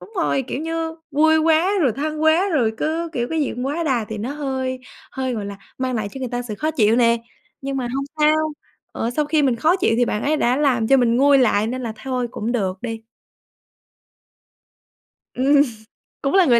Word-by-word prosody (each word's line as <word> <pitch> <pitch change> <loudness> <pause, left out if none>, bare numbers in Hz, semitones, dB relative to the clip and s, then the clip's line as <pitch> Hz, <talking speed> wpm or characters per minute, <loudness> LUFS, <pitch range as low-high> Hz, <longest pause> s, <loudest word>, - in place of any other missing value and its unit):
Đúng 440 - -14
rồi, 295 -5 +1
kiểu 275 - -3
như 325 0 -3
vui 315 +2 +4
quá 325 +3 +3
rồi 255 -7 +3
thân 305 +2 -3
quá 320 +5 +4
rồi 245 - +1
cứ, 325 +2 -1
kiểu, 240 -3 -2
cái 325 - 0
gì 285 - 0
cũng 250 +2 -3
quá 305 +5 -2
đà 250 -7 +1
thì 215 -1 -5
nó 235 +6 -4
hơi 265 -3 -3 0.3
hơi, 260 -1 -2
gọi 210 -3 -4
là, 200 0 -7 0.2
mang 260 -1 -1
lại 215 -3 -2
cho 270 - -7
người 255 - -3
ta 245 +1 -3
sự 220 -3 -6
khó 310 +8 -1
chịu 225 -7 +3
nè. 235 -1 +4 0.4
Nhưng 275 0 -3
mà 250 -2 -2
hông 275 +1 -1 0.2
sao, 305 +1 +5 0.6
ờ, 230 - -2
sau 300 +5 0
khi 300 0 +2
mình 255 -4 +2
khó 320 +10 +3
chịu 365 - +1
thì 245 - +3
bạn 210 - -2
ấy 305 +2 +1
đã 250 -3 +2
làm 255 -6 +1
cho 270 - +6
mình 240 -2 +3
nguôi 280 +1 +5
lại 215 -4 +3
nên 255 +2 -3
là 230 -2 -3
thôi 255 -2 -2
cũng 230 +3 -3
được 190 -5 -1
đi. 225 -2 -5 2.3
Ừm, 280 +2 +4 0.6
cũng 275 - -1
là 380 -1 +6
người 240 -5 +5
265 Hz, 220 wpm, -21 LUFS, 240-305 Hz, 2.3 s, cho